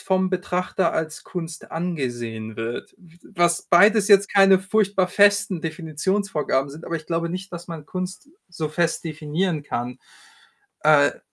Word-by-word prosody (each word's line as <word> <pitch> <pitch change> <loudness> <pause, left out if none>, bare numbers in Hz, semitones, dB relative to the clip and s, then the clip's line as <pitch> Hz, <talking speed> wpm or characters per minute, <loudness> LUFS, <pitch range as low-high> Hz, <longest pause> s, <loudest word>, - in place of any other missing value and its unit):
vom 190 -1 +1
Betrachter 180 -1 -1
als 160 -1 -3
Kunst 165 -3 -7
angesehen 120 -10 -4
wird. 115 +1 -5
W 170 -4 -20 0.2
was 175 0 +2
beides 205 +3 +5
jetzt 200 -1 +5
keine 195 -1 +6
furchtbar 195 -1 +1
festen 200 -2 +3
Definitionsvorgaben 160 -2 -1
sind, 155 +4 -11
aber 165 - -3
ich 155 - -10
glaube 170 0 -1
nicht, 185 +2 -6
dass 170 0 -7
man 165 -3 -8
Kunst 185 - -6 0.2
so 165 -3 -4
fest 170 +3 -1
definieren 155 +1 -2
kann. 125 -3 -4 0.8
Äh 150 -2 +4
170 Hz, 145 wpm, -23 LUFS, 155-190 Hz, 0.8 s, keine